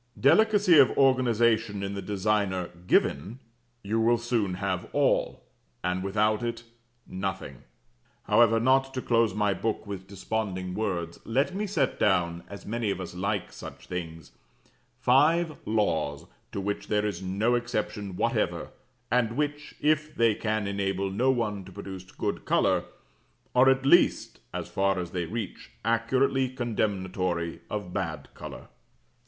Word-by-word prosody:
Delicacy 200 - +5
of 135 - +7
organization 115 -5 +3
in 100 0 -3
the 100 - -4
designer 100 -3 0 0.2
given, 95 - +1 0.5
you 110 +3 0
will 115 +1 +4
soon 115 -5 -1
have 95 -1 -3
all, - - +1 0.4
and 90 +1 -1
without 105 +2 +1
it, 120 0 -3 0.4
nothing. 95 -8 -4 0.7
However, 115 -1 +4
not 135 +2 +2
to 130 - -2
close 115 -4 +2
my 105 -1 +2
book 110 +4 -2
with 95 -2 -7
desponding 95 -2 -3
words, 90 -5 -3
let 135 +10 0
me 205 +2 -2
set 155 -10 0
down, 85 -3 +1
as 100 - -9
many 115 0 -2
of 95 -2 -2
us 90 -2 -6
like 95 +3 -2
such - - -10
things, 80 -4 -6 0.7
five 155 +6 +3
Laws 90 -9 0 0.3
to - - -4
which 100 +1 -3
there 105 0 +1
is 100 -4 -3
no 100 +6 0
exception 105 -5 -2
whatever, - - 0 0.4
and 120 -1 +1
which, 145 0 -2
if 155 +1 +1
they 115 -2 +4
can 110 0 -1
enable 100 -1 -1
no 120 +7 +1
one 110 -6 0
to 95 - -12
produce 95 0 -8
good - - -3
colour, - - +2 0.7
are 130 +1 +6
at 135 0 +2
least, 175 +6 +3
as - - -4
far 95 0 +1
as 90 -1 -4
they 90 -2 -2
reach, 110 +3 -6 0.2
accurately 130 +4 +2
condemnatory 95 -8 -2
of 105 -4 -4
bad - - -3
colour. - - -9
105 Hz, 145 wpm, -27 LUFS, 95-120 Hz, 0.7 s, of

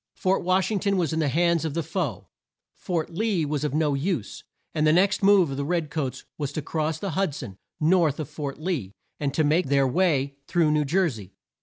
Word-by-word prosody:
Fort 190 +1 +1
Wash 185 +3 +2
ing 205 - +1
ton 200 0 +1
was 165 -3 0
in 160 - 0
the 155 - +1
hands 170 +2 +2
of 160 -2 -3
the 165 - 0
foe; 160 - -3 0.5
Fort 170 -3 -3
Lee 190 -2 0
was 145 -1 -2
of 150 -1 -1
no 155 -2 +2
use; 140 - -2 0.3
and 155 0 +2
the - - +6
next 190 +5 +3
move 195 -6 +5
of 135 - -4
the 140 - -1
red 165 -1 -1
coats 150 -5 -3
was 145 -2 -2
to 155 - -2
cross 155 +1 -1
the 195 +3 -4
Hud 185 -3 0
son, 100 -10 -8 0.2
north 160 -2 +3
of 155 - -3
Fort 145 -2 -5
Lee, 155 - -3 0.3
and 140 -2 -1
make 160 +3 +2
their 140 0 +3
way 140 -2 +1
through 165 -3 +2
New 150 -1 +2
Jer 180 +6 +2
sey. 105 - -7
155 Hz, 220 wpm, -25 LUFS, 145-180 Hz, 0.5 s, the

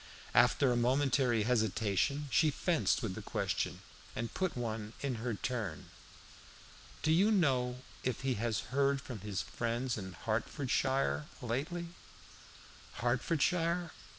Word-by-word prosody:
After 125 +2 +5
a - - +2
momentary 125 -1 +3
hesitation 115 +4 +1
she 155 +3 +5
fenced 150 -3 +1
with 105 -5 -1
the - - -6
question, - - -2 0.3
and 115 0 -3
put 185 -7 -1
one 110 -2 -3
in 130 -5 -2
her 120 -2 -1
turn. 105 -9 -4 1.1
"Do 155 - +3
you 190 +6 +5
know 130 - +2 0.2
if 130 -3 -1
he 135 -1 +1
has 110 -3 -1
heard 140 0 +3
from 125 -5 -7
his 100 -1 -3
friends 120 0 -2
in 95 -2 -7
Hertfordshire 130 - 0 0.2
lately?" 155 +9 -2 1.0
"Hertfordshire? 165 - +1
125 Hz, 125 wpm, -34 LUFS, 115-140 Hz, 1.1 s, After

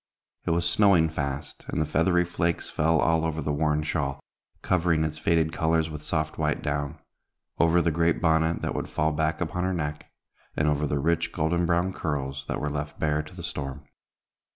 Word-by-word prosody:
It - - -1
was 85 +1 +2
snowing 85 -2 +4
fast, 70 -3 -4
and - - -2
the 75 - +2
feathery 90 +3 +2
flakes 85 -1 -1
fell 80 +1 +2
all 80 +1 +3
over 80 -1 -1
the 75 -1 -1
worn 75 0 +1
shawl, 70 -3 -2 0.4
covering 85 -3 +2
its 75 0 -3
faded 80 0 +2
colors 80 0 +1
with 75 -1 -6
soft 80 0 -2
white - - 0
down; 70 -1 -2 0.6
over 85 +1 +4
the 85 - +2
great 85 +1 +2
bonnet 80 0 +2
that - - -1
would - - -3
fall 80 +1 +1
back 80 +1 0
upon 90 +1 -1
her 95 0 0
neck; 75 -2 -4 0.5
and 75 - +2
over 75 0 +1
the 70 - 0
rich, 85 +3 +1
golden 85 +1 0
brown 85 +2 +1
curls, 70 -4 -3
that - - -2
were 75 - -2
left 75 0 -4
bare 75 -1 +1
to 75 - -13
the - - -8
storm. 70 0 -5
80 Hz, 195 wpm, -26 LUFS, 75-85 Hz, 0.6 s, snowing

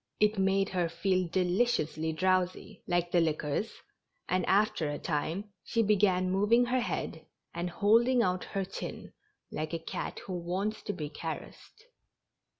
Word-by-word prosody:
It 210 -1 +3
made 195 0 +2
her 180 -3 0
feel 185 +2 +1
deliciously 175 -3 +1
drowsy, 185 +4 0
like 175 -1 +1
the 175 - +4
liquors, 155 +5 -1 0.6
and 185 0 +1
after 195 -6 +2
a 145 - -3
time 170 +8 -2
she 230 -1 +1
began 190 -3 +3
moving 210 +6 +4
her 250 +1 +1
head, 240 - -3 0.3
and 170 +1 -2
holding 230 +6 +4
out 180 -2 0
her 195 -1 -2
chin, - - -7 0.4
like 155 +2 -4
a - - 0
cat 165 - -5
who 190 - -5
wants 185 +5 -2
to 205 - -2
be 150 -5 -5
caressed. 165 - -7
185 Hz, 150 wpm, -30 LUFS, 170-210 Hz, 0.6 s, the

